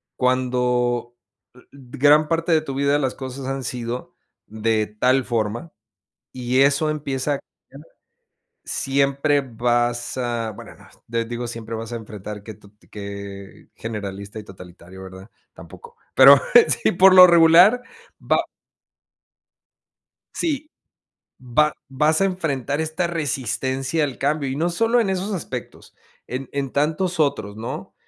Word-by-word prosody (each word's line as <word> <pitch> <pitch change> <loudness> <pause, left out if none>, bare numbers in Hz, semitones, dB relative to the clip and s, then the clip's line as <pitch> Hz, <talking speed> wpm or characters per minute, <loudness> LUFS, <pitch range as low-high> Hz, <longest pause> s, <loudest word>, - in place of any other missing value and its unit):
Cuando 125 -1 0 0.4
l 125 - -18
gran 145 +3 +2
parte 165 +2 -1
de 160 -1 +4
tu 140 -3 -6
vida 140 +1 +2
las 130 -3 -2
cosas 130 0 -7
han 135 0 -3
sido 120 0 -5 0.3
de 110 0 -1
tal 130 +2 +3
forma 115 +6 -3 0.6
y 125 +1 0
eso 140 +3 +3
empieza 145 -2 -2
a 140 - -5 0.3
cambiar, - - -14 0.8
siempre 140 +1 +1
vas 120 0 -1
a 120 -3 -2
bueno, 100 - -12
no, - - -18 0.2
te 115 0 -1
digo, 120 +1 -5
siempre 115 -1 -7
vas 115 0 -5
a - - -4
enfrentar 105 -2 -8
que 110 - -9
tu 100 0 -19 0.2
que 100 -1 -9
generalista 100 -2 -7
y 110 - -7
totalitario, 90 -1 -13
¿verdad? 95 +2 -11 0.2
Tampoco, 475 0 -14 0.2
pero - - +9 0.4
sí, - - +3
por 185 +1 +6
lo 185 0 +11
regular 170 +7 +6 0.4
va - - +2 2.0
sí, 305 -2 -2 0.7
va 135 +4 +1 0.2
vas 150 +5 +1
a - - +4
enfrentar 150 -6 -2
esta 160 +3 -2
resistencia 135 -2 -2
al 140 -4 -3
cambio. 145 0 -1
Y 130 - -3
no 165 +4 0
solo 225 +7 +2
en 220 -5 +1
esos 190 +2 -2
aspectos, 180 - -7 0.3
en 130 +1 -5
en 140 -2 -3
tantos 160 +5 -1
otros, 110 -9 0
¿no? 115 +4 -6
130 Hz, 135 wpm, -22 LUFS, 115-155 Hz, 2.0 s, lo